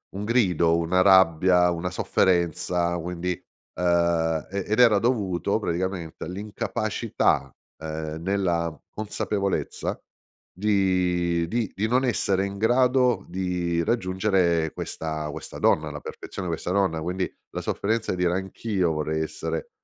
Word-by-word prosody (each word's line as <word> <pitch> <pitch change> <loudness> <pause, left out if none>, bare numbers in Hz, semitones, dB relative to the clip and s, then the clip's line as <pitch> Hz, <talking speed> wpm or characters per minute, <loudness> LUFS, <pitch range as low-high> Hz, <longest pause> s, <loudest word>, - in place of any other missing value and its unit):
un 100 - -4
grido, 90 -8 +3
una 85 +2 +2
rabbia, 90 -1 +5
una 90 +1 -2
sofferenza, 85 0 +1
quindi 90 +1 -4 0.5
uhm, 85 -2 +1
e 100 0 -3
ed 110 +3 0
era 115 -4 +7
dovuto 100 -4 0
praticamente 90 -3 -3
all'incapacità 105 +4 -1 0.2
ehm, 80 0 -5
nella 85 -4 0
consapevolezza 100 -2 -2 0.5
di 90 -4 +1
di 115 +2 -1
di 105 +3 0
non 125 +3 +2
essere 100 -5 +1
in 100 0 -5
grado 125 +3 +3
di 90 -2 -1
raggiungere 95 -5 +1
questa 80 -1 -4
questa - - -8
donna 75 0 +2
alla 75 0 -6
perfezione, 90 - -7
questa 85 +1 -3
donna, 95 -4 +1
quindi 90 +2 -2 0.2
la - - -4
sofferenza 110 +2 -1
di - - -4
dire 85 - +2
anch'io 95 -2 -1
vorrei 80 +1 -1
essere 80 +1 -4
90 Hz, 125 wpm, -25 LUFS, 85-100 Hz, 0.5 s, era